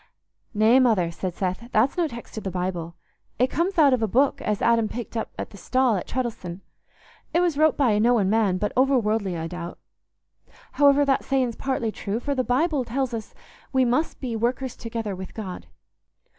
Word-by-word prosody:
'" - - -51
"Nay, 220 +5 +5
Mother," 215 -10 +3
said 180 +1 -4
Seth, 190 +5 -3
"that's 235 +5 +2
no 345 -2 +1
text 235 -4 -10
o' 220 - -4
the 195 - -3
Bible. 175 -2 -3 0.4
It 255 +1 +2
comes 350 +5 -1
out 290 -4 +6
of 250 - +1
a 220 - +2
book 260 +7 +2
as 210 -1 -1
Adam 230 -2 +2
picked 235 0 -6
up 225 - -2
at - - -5
the 200 - -12
stall 255 +2 +2
at 185 - -4
Treddles'on. 210 -8 -4 0.7
It - - +5
was 350 -4 +2
wrote 310 +1 +3
by 265 -5 +3
a 210 - +2
knowing 230 -3 +3
man, 205 -3 +2
but 210 +2 -2
overworldly, 220 -8 +2
I 165 - -3
doubt. 175 0 -6 0.9
However, 285 0 +4
that 270 -1 +1
saying's 255 -4 0
partly 260 -5 -2
true; 210 +1 -3
for 285 +3 -2
the 260 -2 0
Bible 280 +3 +1
tells 255 +1 -2
us 220 -2 -6 0.4
we 260 -1 +3
must 255 +7 0
be 245 -4 -3
workers 245 +3 -1
together 225 -3 -4
with 185 0 -9
God." 190 -5 -7
235 Hz, 200 wpm, -24 LUFS, 205-265 Hz, 0.9 s, out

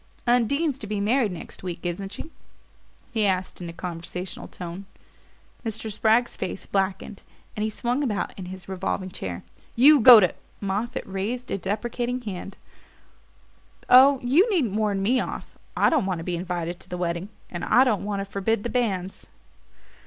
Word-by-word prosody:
"Undine's 265 +5 +2
to 210 - -7
be 210 0 -2
married 220 +1 +2
next 180 - -9
week, 175 -2 -5
isn't 195 +3 -3
she?" 320 - -8 0.8
he 225 -3 0
asked 185 -1 -2
in 175 - -5
a - - -5
conversational 175 +1 -6
tone. 180 +2 -8 0.8
Mr. 220 -1 -4
Spragg's 225 +3 +2
face 190 0 -5
blackened 195 +1 -2 0.3
and 210 - -2
he 215 - 0
swung 245 +5 -1
about 215 -7 -2
in 190 - -7
his 185 0 -9
revolving 185 0 -3
chair. 90 - -6 0.3
"You 285 +5 +7
go 240 -1 +11
to 180 -4 +2 0.2
" - - -34
Moffatt 205 +4 -2
raised 205 +6 -4
a 195 - -1
deprecating 240 +6 -2
hand. 195 -3 -7 1.3
"Oh, 265 +2 +8
you 310 - +4
needn't 300 - +1
warn 205 -2 0
me 250 +6 +3
off. - - -5 0.2
I - - +4
don't 290 - +2
want 185 -2 -1
to 165 - -6
be 175 0 -2
invited 175 -1 -3
to - - -12
the 180 - -4
wedding. 175 +2 -2 0.2
And 175 -1 -5
I 250 - +5
don't 220 -7 +1
want 200 -1 -2
to - - -4
forbid 200 +2 -1
the 240 - -3
banns." 195 -7 -2
200 Hz, 175 wpm, -25 LUFS, 185-240 Hz, 1.3 s, go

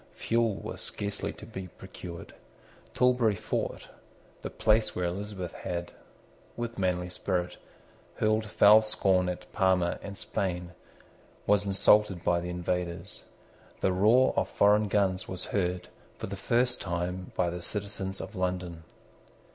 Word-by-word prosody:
Fuel 115 -2 +1
was - - -6
scarcely 100 0 -3
to - - -11
be 95 -1 -7
procured. 90 -2 -10 0.6
Tilbury 125 -4 +3
Fort, 110 +2 -3 0.5
the - - -4
place 110 0 +2
where 90 - -1
Elizabeth 95 0 -4
had, 85 -2 -4 0.7
with 120 -2 -4
manly 90 -1 0
spirit, 90 0 -2 0.6
hurled 110 0 +1
foul 105 +1 +7
scorn 95 -4 +2
at 90 - -7
Parma 95 -3 +2
and 100 -1 -7
Spain, 90 -3 -2 0.7
was 100 0 +3
insulted 100 -1 +4
by 85 0 +2
the 90 +1 -5
invaders. 90 +1 -3 0.6
The 95 - +2
roar 110 +8 +5
of - - +1
foreign 105 +1 +4
guns 95 -2 +1
was 95 - -5
heard, 90 -2 0 0.3
for - - -5
the 100 - -5
first 120 +5 +1
time, 90 +2 -3
by 85 -1 +1
the 90 0 -5
citizens 100 0 -4
of 110 - -7
London. 90 -2 -2
95 Hz, 135 wpm, -29 LUFS, 90-105 Hz, 0.7 s, foul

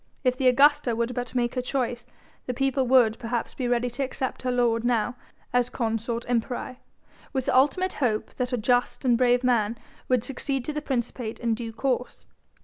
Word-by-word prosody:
If 255 -1 +2
the 260 0 +1
Augusta 275 -1 +4
would 235 +2 -1
but 245 0 -5
make 240 -1 +1
her 255 - -1
choice, 245 -2 -2 0.4
the 250 - -2
people 270 0 +1
would 240 -3 +4
perhaps 235 -1 -3
be 255 - -3
ready 245 0 +1
to 245 - -5
accept 260 0 -3
her 255 - -1
lord 235 -2 +2
now 240 0 +1 0.4
as 245 0 +2
Consort 230 0 -2
Imperii, 245 +1 -2 0.6
with 265 -2 -1
the - - +1
ultimate 295 +8 +3
hope 225 -6 -1
that 250 0 -1
a 250 - 0
just 245 +4 +1
and 245 -2 +5
brave 245 +1 +3
man 230 -3 +2 0.3
would 250 -3 +3
succeed 270 0 -2
to 305 - -3
the 300 - -3
principate 240 -4 -3
in 235 -1 0
due 225 0 -4
course. 250 +2 -2
245 Hz, 190 wpm, -26 LUFS, 235-260 Hz, 0.6 s, and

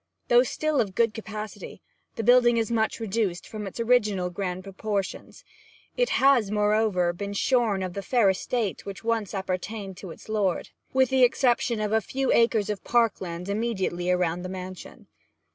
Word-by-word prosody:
Though 240 0 +7
still 300 +3 0
of 195 -4 -4
good 230 -1 +2
capacity, 215 -1 -7 0.4
the 225 - -3
building 240 0 +5
is 230 0 0
much 220 0 0
reduced 210 -4 -2
from 210 -2 -6
its 195 - -8
original 210 -6 +2
grand 185 0 -4
proportions; 200 0 -4 0.5
it - - +1
has, 265 -6 +4
moreover, 210 -4 +2
been 200 +3 -5
shorn 220 -3 +1
of 185 -1 -4
the 200 - -4
fair 225 +2 +2
estate 210 +1 -2
which 200 +1 -8
once 225 -3 -1
appertained 190 +1 -4
to 190 - -9
its - - -12
lord, 205 -4 -1 0.2
with 260 -1 +3
the 265 -1 +3
exception 245 -2 +3
of 210 -1 -1
a 220 - +3
few 265 +7 -1
acres 225 -3 +3
of 205 - -6
park 235 -3 +2
land 175 0 -5
immediately 200 -5 -1
around 180 -1 +1
the 185 - -6
mansion. 185 0 -8
210 Hz, 170 wpm, -26 LUFS, 190-235 Hz, 0.5 s, Though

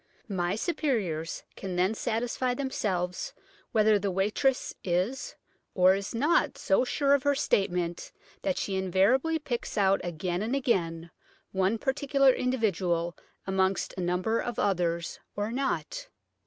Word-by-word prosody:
"My 185 -3 -1
superiors 215 - -1
can 190 -2 -5
then 185 +4 +2
satisfy 240 +3 -1
themselves 190 -10 -2 0.4
whether 215 -1 +4
the 200 0 -1
waitress 210 +8 +1
is 185 +9 -1 0.4
or 185 -1 +6
is 200 +4 -3
not 280 +1 +2
so 195 +5 +2
sure 280 +2 +2
of 280 - +4
her 285 +1 +2
statement 175 -8 0 0.3
that 285 -2 -1
she 195 - -2
invariably 195 - +2
picks 255 -8 -4
out 195 -1 +3
again 175 +1 -2
and 230 +5 -1
again 170 -10 0 0.4
one 190 +3 +1
particular 275 +1 +3
individual 185 -10 0 0.3
amongst 190 0 0
a 185 - -4
number 180 +6 0
of 240 -2 -3
others 170 -3 0 0.2
or 205 +2 -2
not." 275 - -2
200 Hz, 130 wpm, -28 LUFS, 180-255 Hz, 0.4 s, or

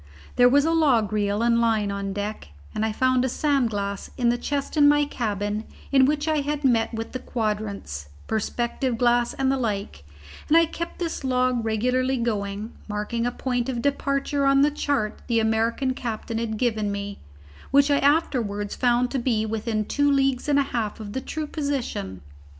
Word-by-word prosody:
There 245 0 +6
was 285 +3 +4
a 325 - +2
log 250 -11 +3
reel 205 +1 0
and 235 0 +3
line 220 -3 +1
on 200 0 -3
deck, 205 - -4 0.3
and 215 - -1
I 220 - +1
found 255 +3 +2
a 260 - 0
sand 275 -2 +1
glass 200 -2 -4
in 240 -2 +2
the 240 - +2
chest 285 +3 -3
in 290 -1 +6
my 295 0 +4
cabin 210 -5 -2 0.3
in 270 -1 +6
which 295 +2 0
I 310 -1 +2
had 295 +1 -3
met 230 -4 +3
with 225 -1 -5
the 255 - -4
quadrants, 205 - -3 0.2
perspective 235 +3 -1
glass, 240 0 +2
and 270 0 +1
the 270 - +1
like, 200 - -3 0.4
and 320 - +5
I 335 - +6
kept 340 +1 -6
this 335 -4 -3
log 255 -2 +1
regularly 250 +4 +1
going, 210 -2 -2
marking 215 +3 -2
a - - -1
point 245 -1 -2
of 240 -2 -3
departure 280 0 0
on 275 0 +5
the 295 - +3
chart 280 -7 -1
the 230 -2 +2
American 225 +4 +1
captain 230 -2 -4
had 220 -2 -2
given 215 -4 0
me, 200 0 -5 0.5
which 280 +1 +4
I 285 - +4
afterwards 235 -9 +1
found 245 0 +2
to 270 - 0
be 230 -3 0
within 220 0 -2
two 285 +5 +1
leagues 270 0 +1
and 285 - +4
a 280 - +4
half 230 -6 -3
of 205 -2 -7
the 260 - -2
true 310 +3 -4
position. 265 - -3
240 Hz, 190 wpm, -24 LUFS, 215-275 Hz, 0.5 s, There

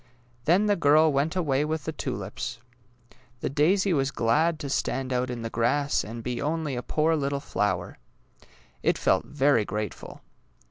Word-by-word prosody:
" 120 0 -34
Then 185 +6 +4
the 205 -1 +3
girl 155 -1 +4
went 145 +5 0
away 145 -6 +1
with 155 -1 -2
the 160 - -3
tulips. 120 -4 -5 0.8
The - - -2
daisy 185 +7 +3
was 135 -3 +1
glad 155 +8 +1
to 145 - -4
stand 135 -1 -1
out 125 0 0
in 120 -2 -5
the 115 - -3
grass 140 +5 +1
and 115 +2 -7
be 125 0 -3
only 150 -2 -1
a 120 - -2
poor 155 +5 +1
little 140 -2 -1
flower. 95 -9 -2 0.8
It - - +2
felt - - +2
very 140 -5 +2
grateful. 105 -1 -5
140 Hz, 170 wpm, -26 LUFS, 120-155 Hz, 0.8 s, Then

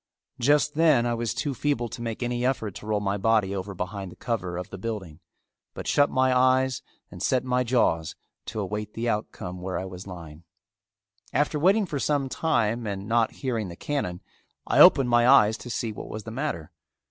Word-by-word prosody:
Just 145 +3 +3
then 155 -6 +4
I 120 - 0
was 115 -1 -2
too 145 -3 -2
feeble 130 -2 -1
to 120 - -8
make 115 0 -4
any 120 0 -2
effort 125 -5 0
to 105 - -10
roll 105 -1 +1
my 100 0 -1
body 105 -1 +2
over 100 +1 -5
behind 95 +1 -5
the - - -13
cover 90 -7 -3
of 90 +2 -6
the 95 - -7
building, 95 -7 -5 0.6
but - - -6
shut 145 0 +3
my 130 0 +2
eyes 130 0 +3 0.3
and 90 0 -10
set 130 +5 +1
my 125 0 +1
jaws 115 -10 +1 0.3
to - - -4
await 105 +1 -4
the 115 +1 -2
outcome 90 -5 -3
where 95 0 -3
I 95 - -3
was 95 0 -9
lying. 85 -4 -10 0.9
After 150 +1 +1
waiting 195 +6 +4
for 150 -5 -4
some 140 -1 0
time 120 -7 0
and 100 0 -4
not 115 0 +2
hearing 115 -6 -3
the 85 - -8
cannon, 90 -8 -3 0.4
I - - +1
opened 125 -3 +7
my 120 0 +5
eyes 110 -5 +6
to 125 - -9
see 115 -1 -2
what 105 - -8
was 110 0 -6
the 110 - -7
matter. 115 - -4
115 Hz, 200 wpm, -26 LUFS, 95-130 Hz, 0.9 s, opened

